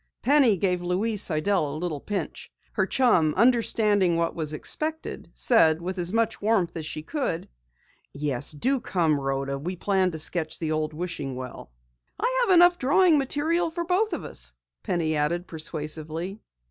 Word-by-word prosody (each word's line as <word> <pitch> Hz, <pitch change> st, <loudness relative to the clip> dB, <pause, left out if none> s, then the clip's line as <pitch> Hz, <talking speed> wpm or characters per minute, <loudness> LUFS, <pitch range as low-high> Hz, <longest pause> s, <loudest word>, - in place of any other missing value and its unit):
Penny 260 Hz, -5 st, +4 dB
gave 180 Hz, -1 st, 0 dB
Louise 195 Hz, +4 st, 0 dB
Sidell 155 Hz, -3 st, +1 dB
a -, -, -4 dB
little 160 Hz, -3 st, -3 dB
pinch. 205 Hz, +6 st, -5 dB, 0.2 s
Her -, -, 0 dB
chum, 180 Hz, -, +3 dB
understanding 210 Hz, -6 st, +3 dB
what 170 Hz, 0 st, 0 dB
was 155 Hz, -3 st, -3 dB
expected, 310 Hz, -, -2 dB
said 160 Hz, -10 st, +4 dB
with 185 Hz, +2 st, -4 dB
as 175 Hz, 0 st, 0 dB
much 225 Hz, 0 st, 0 dB
warmth 205 Hz, -5 st, +2 dB
as 160 Hz, -2 st, -5 dB
she 155 Hz, -, -6 dB
could: 260 Hz, -, -3 dB, 0.6 s
"Yes, 140 Hz, -2 st, -2 dB
do 255 Hz, -, 0 dB
come, 165 Hz, -9 st, +1 dB
Rhoda. 135 Hz, 0 st, -2 dB
We 180 Hz, +6 st, -4 dB
plan 190 Hz, 0 st, +1 dB
to 160 Hz, -, -6 dB
sketch 160 Hz, 0 st, 0 dB
the 160 Hz, -2 st, -3 dB
old 155 Hz, 0 st, -2 dB
wishing 155 Hz, -6 st, -4 dB
well." 125 Hz, -, -8 dB, 0.5 s
"I -, -, 0 dB
have 375 Hz, -, +5 dB
enough 350 Hz, 0 st, +6 dB
drawing 310 Hz, +4 st, +4 dB
material 315 Hz, +5 st, 0 dB
for 340 Hz, +1 st, -4 dB
both 375 Hz, +4 st, +1 dB
of -, -, -3 dB
us," -, -, -6 dB, 0.3 s
Penny 160 Hz, -3 st, -1 dB
added 170 Hz, +4 st, 0 dB
persuasively. 160 Hz, +3 st, -4 dB
180 Hz, 160 wpm, -26 LUFS, 155-240 Hz, 0.6 s, enough